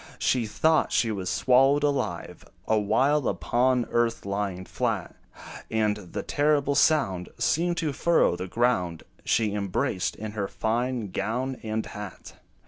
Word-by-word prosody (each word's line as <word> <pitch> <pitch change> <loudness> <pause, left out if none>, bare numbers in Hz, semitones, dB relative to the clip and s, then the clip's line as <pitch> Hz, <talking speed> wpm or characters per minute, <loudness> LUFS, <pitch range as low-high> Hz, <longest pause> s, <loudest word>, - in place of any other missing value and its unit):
She 120 -4 +1
thought 160 +8 +2
she 115 -2 +2
was 95 -3 -3
swallowed 135 +3 +4
alive, 140 -3 -2 0.2
Awhile 130 +7 +2
upon 125 0 +1
earth 120 -2 0
lying 100 -2 -3
flat; - - -2 0.5
And 110 -2 +1
the 90 -4 -6
terrible 145 -1 +1
sound 95 - +2
Seemed 170 +8 +1
to 155 -4 -1
furrow 170 - +2
the 90 +2 -5
ground, 90 -7 0 0.2
She 110 -3 +1
embraced 100 -2 -1
in 110 0 -6
her 105 -2 -3
fine 120 -1 -2
gown 125 +6 -2
and 110 0 -3
hat. 105 -3 -9
115 Hz, 135 wpm, -26 LUFS, 105-135 Hz, 0.5 s, swallowed